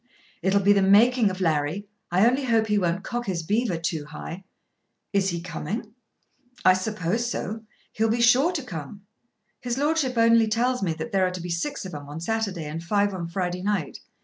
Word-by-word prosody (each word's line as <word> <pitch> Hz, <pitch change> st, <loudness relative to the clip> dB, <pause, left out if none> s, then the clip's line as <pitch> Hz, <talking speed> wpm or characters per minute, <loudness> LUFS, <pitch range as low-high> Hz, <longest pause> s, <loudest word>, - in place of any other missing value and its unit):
"It'll 190 Hz, +3 st, +2 dB
be 200 Hz, +1 st, +5 dB
the 200 Hz, -, +3 dB
making 215 Hz, +4 st, +5 dB
of 185 Hz, 0 st, -6 dB
Larry. 160 Hz, +3 st, 0 dB, 0.2 s
I 185 Hz, +4 st, +4 dB
only 260 Hz, +3 st, +2 dB
hope 225 Hz, -3 st, +3 dB
he 210 Hz, -1 st, +1 dB
won't 180 Hz, 0 st, -1 dB
cock 240 Hz, -1 st, -4 dB
his 175 Hz, -4 st, -2 dB
beaver 210 Hz, +1 st, 0 dB
too 165 Hz, -2 st, -3 dB
high." 165 Hz, +4 st, -8 dB, 0.7 s
"Is 195 Hz, -1 st, +2 dB
he 170 Hz, -1 st, -2 dB
coming?" 185 Hz, +6 st, -5 dB, 0.7 s
"I 185 Hz, -, +8 dB
suppose 210 Hz, +3 st, -1 dB
so. 220 Hz, -1 st, -4 dB, 0.3 s
He'll 220 Hz, +1 st, 0 dB
be 230 Hz, +2 st, +1 dB
sure 250 Hz, +8 st, +5 dB
to 305 Hz, -6 st, -3 dB
come. 175 Hz, -, -8 dB, 0.6 s
His 245 Hz, 0 st, -3 dB
Lordship 290 Hz, -3 st, 0 dB
only 230 Hz, 0 st, +5 dB
tells 245 Hz, +3 st, +1 dB
me 175 Hz, -4 st, 0 dB
that 160 Hz, +9 st, -6 dB
there 190 Hz, -2 st, +3 dB
are -, -, 0 dB
to 180 Hz, 0 st, -6 dB
be 175 Hz, 0 st, -5 dB
six 235 Hz, -, -3 dB
of 185 Hz, -, -7 dB
'em 145 Hz, -1 st, -8 dB
on 150 Hz, +2 st, -6 dB
Saturday 200 Hz, -3 st, -2 dB
and 160 Hz, +3 st, -5 dB
five 200 Hz, +2 st, +1 dB
on 175 Hz, -3 st, -4 dB
Friday 180 Hz, +1 st, -3 dB
night. 195 Hz, -6 st, -2 dB
200 Hz, 200 wpm, -25 LUFS, 170-230 Hz, 0.7 s, I